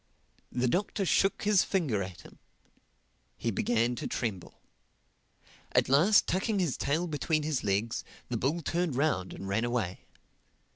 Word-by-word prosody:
The 125 +1 0
Doctor 195 - 0
shook 195 +2 +2
his 205 -2 +4
finger 150 - 0
at 95 -1 -6
him. - - -16 1.0
He 115 - -1
began 120 +3 +1
to - - -3
tremble. 100 -7 -4 1.2
At - - +3
last, 170 +10 +5
tucking 200 +4 0
his 175 -8 +1
tail 155 +5 0
between 155 -1 0
his 150 -3 -1
legs, 105 +3 0 0.2
the 125 - -3
bull 145 +9 0
turned 170 -4 -1
round 130 -10 0
and 95 - -7
ran 100 +4 0
away. 120 -7 -2
135 Hz, 145 wpm, -30 LUFS, 110-175 Hz, 1.2 s, last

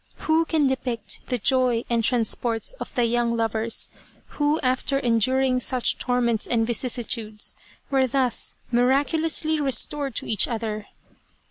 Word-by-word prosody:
Who 320 +1 +3
can 315 -3 +1
depict 250 -4 -1
the 250 - -1
joy 250 0 +1
and 235 -1 0
transports 235 - +1
of - - -7
the 245 - +2
young 235 0 0
lovers, 225 0 0 0.4
who 295 +1 0
after 260 +1 0
enduring 255 +1 +2
such 250 0 0
torments 240 -3 0
and 225 -2 +1
vicissi 240 +1 0
tudes, 215 -3 -2 0.4
were 265 -1 +3
thus 255 -1 -1 0.2
miraculously 300 +5 +1
restored 275 -1 +1
to - - -2
each 215 - +1
other 220 -3 -4
250 Hz, 135 wpm, -24 LUFS, 230-270 Hz, 0.4 s, Who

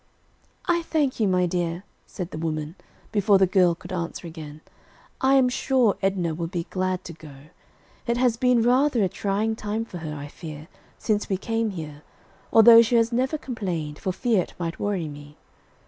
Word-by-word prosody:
"I 345 -1 +2
thank 300 -6 -1
you, 215 - +3
my 180 -1 +2
dear," 175 0 -2 0.2
said 180 -2 -6
the - - -6
woman, 155 -1 -3 0.4
before 205 -2 +4
the 190 - +5
girl 180 -2 +3
could 180 - -10
answer 170 0 -4
again. 155 -2 -9 0.6
"I 265 +1 +4
am 265 -2 +5
sure 250 -3 +2
Edna 190 -4 0
will 165 +1 -3
be 170 -1 -4
glad 185 0 -1
to 170 - -8
go. 155 -3 -13 0.7
It 235 0 +1
has 245 -2 +2
been 245 -1 +3
rather 250 -1 +3
a - - +3
trying 205 +3 -1
time 215 +1 -3
for 180 -6 -8
her, 155 -2 -5
I 145 0 -7
fear, 155 +1 -10 0.3
since 210 -2 -1
we 190 - +1
came 225 +2 -1
here, 155 -6 -7 0.5
although 230 +1 +9
she 235 +1 +1
has 230 0 +3
never 260 +5 0
complained, 180 - -4
for 190 - -2
fear 210 +1 +1
it - - -9
might 170 -1 -4
worry 195 -6 -1
me. 145 0 -11
190 Hz, 185 wpm, -24 LUFS, 165-230 Hz, 0.7 s, although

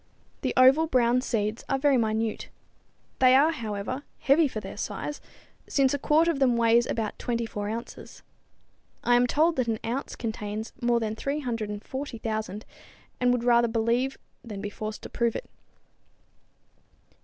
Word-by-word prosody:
The - - -2
oval, 270 +5 +6
brown 250 -3 +3
seeds 220 -3 -2
are 270 - +2
very 280 0 +3
minute. 220 -2 -1 0.7
They 255 0 +6
are, 295 +4 +5
however, 225 -1 -4 0.2
heavy 295 +3 +4
for 225 - -5
their - - -8
size, 295 - -5 0.5
since 270 -1 +3
a 285 - -1
quart 315 +4 +3
of 330 -5 +1
them 250 -3 +3
weighs 235 +1 +4
about 220 -2 -3
24 230 -4 -3
ounces. 230 +2 -7 0.8
I 245 - +4
am 245 0 +4
told 320 +4 +2
that 255 -2 +1
an 225 -1 0
ounce 245 +5 -3
contains 220 -1 -5
more 240 -1 +2
than 220 -1 -2
340,000, 225 -4 -4 0.5
and 250 0 +3
would 245 -1 0
rather 235 -1 +4
believe 235 +4 0 0.3
than 210 -4 -7
be 205 0 -5
forced 215 +1 -6
to - - -7
prove 235 -1 0
it. - - -5
235 Hz, 150 wpm, -27 LUFS, 220-265 Hz, 0.8 s, oval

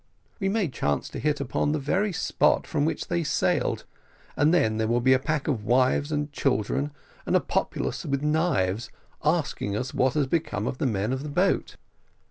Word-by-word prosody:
We 195 -2 0
may 205 -2 +1
chance 75 - -1
to - - -6
hit 150 -1 0
upon 140 +2 0
the - - +1
very 190 +9 0
spot 180 - +2
from 150 -3 0
which 160 - -1
they 170 -1 0
sailed, 145 - 0 0.5
and 150 +3 +3
then 110 -11 +2
there 110 0 0
will 120 +2 +2
be 130 +2 +4
a 130 - +4
pack 150 +1 -2
of 125 -9 -1
wives 130 +5 +2
and 150 -1 -1
children, 135 +1 0 0.3
and - - 0
a - - +6
populace - - -2
with 140 0 -2
knives, 120 - +1 0.3
asking 150 -10 0
us 125 +3 -4
what 130 +2 +2
has 150 -2 +2
become 150 - -1
of 125 - -3
the 145 - +1
men 105 +1 0
of 130 - -3
the 150 - -5
boat." 145 - +1
140 Hz, 195 wpm, -26 LUFS, 120-155 Hz, 0.5 s, a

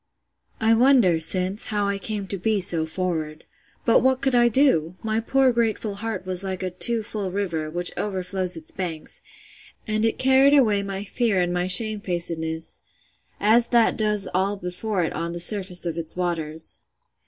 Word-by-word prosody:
I 225 0 +3
wonder, 235 -8 +4
since, 185 +5 0
how 205 -1 -1
I 200 0 -2
came 210 -1 -4
to 195 - -4
be 215 +2 0
so 165 -3 +1
forward. 160 -3 -4 0.4
But 230 - +5
what 260 0 +2
could 265 -1 0
I 240 -1 +5
do?—My 220 - +1
poor 265 +3 +2
grateful 225 -2 -1
heart 225 -4 -4
was 185 0 0
like 190 -1 -4
a 185 - -3
too 225 +5 +2
full 205 -3 -4
river, 175 -6 -3
which 175 +2 +2
overflows 185 -2 -1
its 160 - -10
banks: 170 -5 -4 0.6
and 215 0 0
it 225 - +1
carried 265 +2 +4
away 215 -7 +3
my 195 0 -5
fear 215 -1 0
and 175 0 0
my 180 0 -1
shamefacedness, 175 -6 0 0.6
as 230 +3 +3
that 235 -2 +3
does 210 -2 0
all 195 +3 0
before 180 +2 -3
it 165 - -3
on 170 0 -4
the 175 - -5
surface 185 -1 +1
of 170 -2 -3
its 165 -1 -2
waters! 160 -3 -2
195 Hz, 170 wpm, -23 LUFS, 175-220 Hz, 0.6 s, But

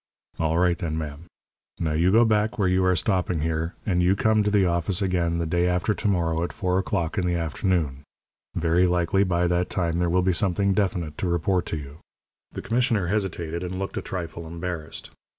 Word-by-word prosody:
"All 80 0 +1
right, 90 -1 +2
then, 80 -4 -2
ma'am. 75 0 -6 0.5
Now 80 -2 0
you 85 +4 +2
go 115 +3 +6
back 110 +2 +1
where 100 -4 +2
you 90 +1 +2
are 90 0 +3
stopping 90 -3 0
here, 80 +1 -2
and 90 -3 +1
you 90 +2 +3
come 110 +1 +3
to 105 - +1
the 100 -2 +3
office 85 +2 0
again 90 -4 0
the 85 - -1
day 85 +2 +1
after 90 +3 +1
to 105 - -3
morrow 85 -4 +1
at 85 - -2
four 90 -1 0
o'clock 95 -1 -1
in 90 - 0
the 90 - +1
afternoon. 80 -3 -1 0.5
Very 85 +2 +3
likely 90 +2 +2
by 90 -2 +1
that 90 +1 +1
time 85 -2 -1
there 90 -1 +1
will 90 +1 +2
be 95 0 +2
something 100 +2 +1
definite 90 -6 -1
to 95 - -1
report 85 +1 0
to 80 - -2
you." 70 +1 -9 0.5
The - - -7
commissioner 115 -6 +1
hesitated, 85 -5 -2
and 90 +1 -4
looked 95 +1 -4
a - - -2
trifle 85 -2 -6
embarrassed. 85 -1 -6
90 Hz, 205 wpm, -25 LUFS, 85-95 Hz, 0.5 s, go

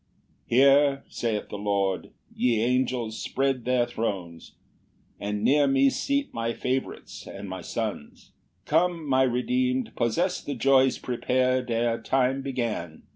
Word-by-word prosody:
5 - - -44 0.4
"Here 140 +2 +4
(saith 110 -3 -3
the 105 - -6
Lord) 100 -2 -1 0.3
ye 120 -3 +2
angels, 120 -1 0
spread 135 -2 -1
their 125 -1 +2
thrones: 95 -8 -5 0.7
"And 105 0 -3
near 145 0 +4
me 135 0 +4
seat 280 0 -1
my 115 0 -2
favorites 130 +2 -4
and 100 +1 -8
my 95 -1 -6
sons: 105 -4 -5 0.3
"Come, 165 0 +1
my 130 -1 +3
redeem'd, 250 - 0
possess 170 +11 0
the 140 - -5
joys 135 +1 +4
prepar'd 130 +1 0
"Ere 115 0 0
time 135 0 +1
began! 115 - -4
125 Hz, 130 wpm, -26 LUFS, 115-135 Hz, 0.7 s, Here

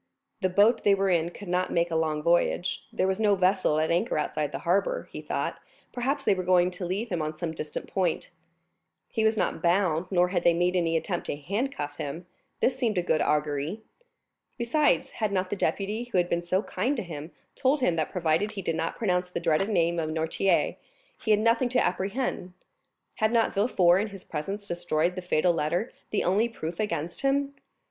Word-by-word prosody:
The 185 - +2
boat 210 +5 +4
they 200 -1 +5
were 195 -1 +1
in 170 -1 +2
could 200 +3 -11
not 180 +1 0
make 170 0 +1
a - - -1
long 155 -2 0
voyage; 175 +2 +1
there - - 0
was 190 +1 0
no 210 -2 +4
vessel 185 -4 +2
at 160 +1 +1
anchor 175 +6 +1
outside 150 -1 -1
the 135 - -3
harbor; 200 - +1
he - - -6
thought, - - -3 0.3
perhaps, 265 +4 -1
they - - +4
were 185 - -2
going 180 0 +3
to 180 0 -5
leave 205 +6 -2
him 175 -3 -1
on 155 0 -3
some 165 0 -3
distant 155 -2 -5
point. 180 -4 -1 0.8
He 220 - -1
was 220 0 +3
not - - -1
bound, 175 -1 +2
nor 180 -1 +3
had 180 -2 0
they 170 - +4
made 175 +2 +1
any 165 -2 +2
attempt 175 +1 -3
to - - -2
handcuff 170 - -3
him; 160 +5 -5 0.4
this 255 - +3
seemed 235 -6 0
a 180 - +2
good 160 -2 +1
augury. 150 +6 0 0.8
Besides, 275 +5 +2
had 215 -3 -2
not 185 -1 -1
the - - 0
deputy, 210 +4 -1
who 240 -6 -2
had 175 0 +2
been 170 - 0
so 185 +4 0
kind 250 +10 -1
to 230 - -2
him, 155 -3 -7 0.2
told 270 +2 +1
him 180 -9 +2
that 155 - 0
provided 175 +4 0
he 195 -2 -5
did 165 - -1
not 165 0 -2
pronounce 180 -4 0
the - - -3
dreaded 170 +4 +1
name 170 -4 +2
of 155 -1 -2
Noirtier, 160 +4 +1 0.5
he - - -3
had 210 -1 +5
nothing 230 +3 +2
to 255 - +2
apprehend? 190 -1 -2 0.6
Had 220 0 +2
not 230 -1 +2
Villefort 195 -4 +4
in 215 - -2
his 195 -3 -10
presence 195 +7 -5
destroyed 175 -1 0
the 185 - -5
fatal 175 0 +2
letter, 170 +8 -1 0.2
the 210 - 0
only 210 +6 +2
proof 165 -6 -6
against 170 -5 -2
him? 275 +1 +1
180 Hz, 205 wpm, -27 LUFS, 165-210 Hz, 0.8 s, they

